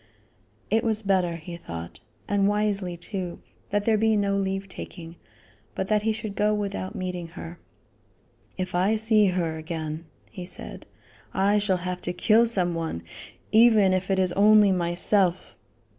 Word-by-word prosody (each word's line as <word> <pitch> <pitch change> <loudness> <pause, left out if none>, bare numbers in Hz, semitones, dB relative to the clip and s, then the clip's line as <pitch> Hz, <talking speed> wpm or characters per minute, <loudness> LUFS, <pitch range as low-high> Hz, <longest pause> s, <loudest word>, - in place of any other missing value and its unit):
It 225 +1 +2
was 220 -1 +1
better, 185 -4 +1
he 170 +1 -8
thought, 85 - -8 0.3
and 200 -1 +2
wisely 205 -4 0
too, 180 0 -6 0.3
that 205 0 0
there 220 -1 +2
be 220 0 +3
no 200 -1 +1
leave 195 0 -2
taking, 170 -3 -9 0.6
but 190 - -3
that 210 -1 +2
he 220 +1 +1
should 215 -2 -5
go 210 +1 +2
without 200 -2 -4
meeting 180 -2 -4
her. 170 +1 -8 1.0
"If 185 -1 -4
I 190 +5 +2
see 215 -1 +4
her 170 -3 -1
again," 160 0 -5 0.3
he 185 - -7
said, - - -5 0.5
"I 200 +2 +3
shall 200 -3 +1
have 180 0 -3
to 175 - -3
kill 225 +5 +4
some 185 -6 +3
one, 165 - -4 0.5
even 220 -4 +5
if 185 +1 -1
it 195 - +2
is 185 -2 +2
only 210 0 +5
myself." 180 +1 +2
190 Hz, 160 wpm, -25 LUFS, 175-210 Hz, 1.0 s, even